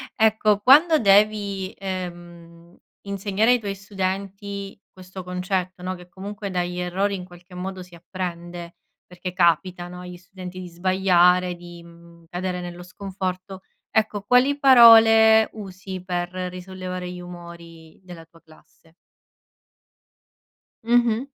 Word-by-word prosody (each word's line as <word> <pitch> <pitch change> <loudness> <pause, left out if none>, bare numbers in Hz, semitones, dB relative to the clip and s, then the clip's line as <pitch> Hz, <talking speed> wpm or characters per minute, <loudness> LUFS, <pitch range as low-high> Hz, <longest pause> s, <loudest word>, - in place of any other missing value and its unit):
Ecco, 215 -1 +3
quando 300 +8 +6
devi, 200 -2 +2
ehm, 175 -2 -8 0.2
insegnare 200 +3 0
ai 250 - +3
tuoi 200 -3 -5
studenti 195 0 -5
questo 185 0 -10
concetto, 180 0 -3
no, 185 +1 -3
che 180 -1 -14
comunque 200 +3 -7
dagli 180 -1 -3
errori 190 +3 -1
in 180 -2 -7
qualche 175 0 -16
modo 185 +1 -6
si 180 0 -19
apprende, 175 -1 -7 0.3
perché 180 0 -8
capita, 175 +1 +1
no, 180 0 -9
agli 180 0 -9
studenti 185 0 -10
di 180 - -8
sbagliare, 180 0 +2
di, 175 0 -12
mhmm, 170 0 -18
cadere 180 0 -4
nello 175 0 -8
sconforto, 185 0 -6 0.3
ecco, 215 -1 0
quali 250 +6 +3
parole 225 -4 +7
usi 190 -2 -8
per 175 -1 -2
risollevare 185 0 -6
gli 180 - -8
umori 170 -2 -12
della 175 -3 -12
tua 165 0 -23
classe? 160 +1 -23 1.9
Mh-mh. 240 0 +2
185 Hz, 125 wpm, -23 LUFS, 175-200 Hz, 1.9 s, parole